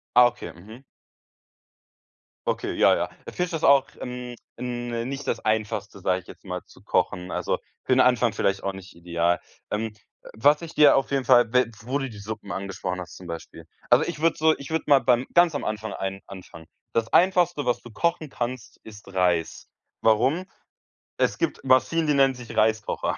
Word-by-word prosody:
Ah, 125 0 +8
okay, - - -8
ja, 110 +9 -13 1.6
Okay, - - -1
ja, - - +5
ja. - - 0 0.2
Äh, - - -7
findest 180 -1 -2
das 160 -1 -3
auch, 140 -1 +5
ähm, 125 0 -6 0.2
hm, 120 -1 -3
nicht 140 +1 -5
das 115 - 0
Einfachste, 110 -1 -2
sage 90 0 +1
ich 90 - -23
jetzt - - -14
mal, 90 -2 -5
zu - - -19
kochen, 90 0 -1
also, - - -1 0.3
für - - 0
den - - +5
Anfang - - +4
vielleicht 100 0 0
auch 100 - -1
nicht 95 -1 -12
ideal. 85 0 0 0.3
Ähm, 110 +1 -2 0.4
was 145 +7 +4
ich 165 -1 -8
dir 150 -2 +7
auf 135 - 0
jeden 135 -2 0
Fall, 120 -1 +5
we 125 -2 +3
wo 130 +5 -1
du 135 -1 -3
die 110 -4 -11
Suppen 105 0 -7
angesprochen 95 -1 -4
hast, 90 - -9
zum 90 - -11
Beispiel. 85 -1 -8 0.2
Also, - - +6
ich 160 -3 -5
würde 165 0 +2
so 160 0 +4
ich 140 - -10
würde 160 0 -1
mal 140 -2 +6
beim 125 0 +2
ganz 175 -2 +5
am 145 - -3
Anfang 110 0 -4
ein 95 0 -4
anfangen. 90 -4 -11 0.3
Das 115 -1 -1
Einfachste, 175 -4 +3
was 125 - +1
du 120 - -11
kochen 170 +6 -1
kannst, 125 -2 -5
ist 105 -2 -12
Reis. 90 -3 0 0.3
Warum? 130 +11 +2 0.7
Es - - +1
gibt - - -2
Maschinen, 135 +5 +3
die 150 - +3
nennen 135 -1 +4
sich 125 -2 -9
Reiskocher. 110 0 +1
120 Hz, 190 wpm, -25 LUFS, 100-140 Hz, 1.6 s, Ah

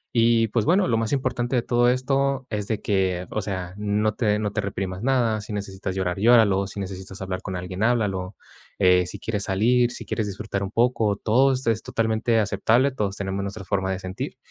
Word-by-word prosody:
Y 115 -1 +4
pues 110 +1 +1
bueno, 185 +1 +3
lo 115 - +2
más 115 -1 -1
importante 130 -2 -1
de 120 - +2
todo 120 0 +3
esto 135 +1 0
es 105 -2 -2
de 110 - -2
que, 95 -3 0
o 110 - -1
sea, 95 -3 -4
no 105 +1 0
te 105 -2 +1
no 105 -1 -2
te 105 - -1
reprimas 95 -1 -4
nada. 120 -4 +1
Si 105 +1 -8
necesitas 95 -2 -4
llorar, 95 -1 -1
llóralo, 105 -4 +4
si 100 - -7
necesitas 95 0 -7
hablar 95 0 -4
con 95 - -5
alguien, 90 +2 -5
háblalo, 100 -5 0 0.4
eh, 90 -2 +4
si - - -6
quieres 105 -3 -3
salir, 120 +5 +3
si - - -8
quieres 110 -2 -2
disfrutar 100 0 -4
un 100 - -3
poco, 115 -3 +2
todo 130 +7 +3
es 115 -4 0
totalmente 115 +1 0
aceptable. 110 +6 +2
Todos 105 -6 -2
tenemos 95 0 -3
nuestra 100 +1 -6
forma 95 -1 -1
de 95 - -2
sentir. 95 0 -6
105 Hz, 205 wpm, -24 LUFS, 95-120 Hz, 0.4 s, Y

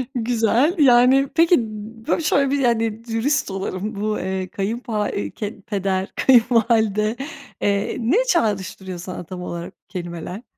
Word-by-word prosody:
Güzel, 240 - +2
yani 260 0 +6
peki 335 +1 +5 0.5
bö - - +1
şöyle 280 -3 +2
bir, 285 - +1
yani, 230 -3 0
dürüst 230 +2 0
olalım 195 +2 -4
bu, 215 0 -1
eee, 190 0 -3
kayın 205 +6 -3
pa 215 -4 -2
eee, 100 -1 -3
ke 210 -1 -6
peder, 195 -3 -2
kayınvalide, 225 -3 +3 0.5
eee, 200 0 0
ne 245 - +2
çağrıştırıyor 195 - -1
sana 180 +1 -6
tam 180 +1 -8
olarak 170 -1 -6
bu - - -76
kelimeler? 175 +3 -6
220 Hz, 140 wpm, -21 LUFS, 190-245 Hz, 0.5 s, yani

